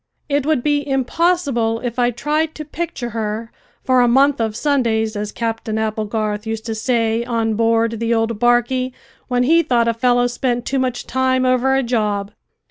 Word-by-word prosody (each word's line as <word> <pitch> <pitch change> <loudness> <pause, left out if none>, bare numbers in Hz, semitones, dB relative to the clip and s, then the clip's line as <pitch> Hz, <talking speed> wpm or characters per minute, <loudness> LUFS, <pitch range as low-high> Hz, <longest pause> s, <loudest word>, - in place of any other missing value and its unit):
It 285 -1 0
would 305 -6 +1
be 290 -1 +1
impossible 270 -4 +1
if 245 0 -4
I 240 0 +3
tried 300 +6 -1
to 305 - -7
picture 300 -6 -5
her 220 +1 -4 0.3
for 255 -1 +3
"a 245 - +4
month 270 +2 +3
of 220 -1 -1
Sundays," 230 -5 0
as 210 0 -3
Captain 225 -1 -3
Applegarth 215 0 -2
used 220 0 -4
to 225 - -3
say 230 0 0
on 230 -2 -1
board 230 0 +1
the 230 0 -1
old 225 -1 0
barquey 245 +2 +2 0.3
when 245 0 +1
he 330 +6 +4
thought 240 -7 +1
a 230 - +2
fellow 245 +1 +2
spent 245 0 -1
too 270 - -1
much 255 -2 -2
time 260 0 +1
over 255 +1 +2
a 270 - +1
job. 210 -4 -1
240 Hz, 180 wpm, -19 LUFS, 225-260 Hz, 0.3 s, a